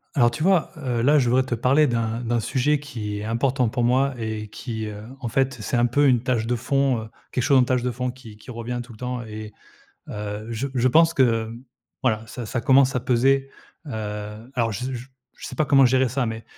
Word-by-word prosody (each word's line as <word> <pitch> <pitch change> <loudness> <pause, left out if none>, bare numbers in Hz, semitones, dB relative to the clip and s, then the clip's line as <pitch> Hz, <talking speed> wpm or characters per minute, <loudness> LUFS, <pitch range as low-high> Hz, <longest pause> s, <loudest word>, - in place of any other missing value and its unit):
Alors, 120 -3 +4
tu 120 - -6
vois, 185 0 +3
heu, 125 -5 -2
là 150 +3 +5
je 125 -3 +1
voudrais 130 +2 +3
te 125 - -3
parler 130 +6 +3
d'un 115 -2 -1
d'un 120 0 0
sujet 140 +5 +1
qui 110 -8 -5
est - - -5
important 125 +2 +1
pour 120 +1 -1
moi 130 +3 +2
et 110 -2 -4
qui, 110 0 -5
heu, 105 0 -7 0.2
en 125 - -4
fait, 135 +3 +1
c'est 120 - -1
un 120 - +4
peu 145 +4 +3
une 125 -3 +3
tâche 120 -4 0
de 120 - +1
fond, 135 +2 +1
heu, 110 - -10 0.2
quelque 125 - -1
chose 135 +2 +5
en - - +5
tâche 125 -1 0
de 125 - 0
fond 125 +1 -3
qui 125 -4 -11
qui 105 +4 -16
revient 120 +1 -4
tout 120 - -14
le - - -14
temps 125 +1 -4
et 110 -1 -8 0.6
heu, 105 +1 -5
je 115 +4 -2
je 130 0 +3
pense 165 +5 +5
que, 120 -6 +2
mmh, 115 +2 -9 0.4
voilà, 110 -3 0
ça 120 +1 -7
ça 120 - -2
commence 135 -1 +4
à - - 0
peser. 135 +3 +2 0.4
Heu, - - -7 0.6
alors 115 -3 0
je 110 +5 -4
z 130 - -3
j 125 0 -7 0.3
je - - -8
sais - - -8
pas 155 - +2
comment 135 -1 +6
gérer 130 +1 +3
ça, 130 +2 -1
mais 110 -1 -4
125 Hz, 240 wpm, -23 LUFS, 115-135 Hz, 0.6 s, comment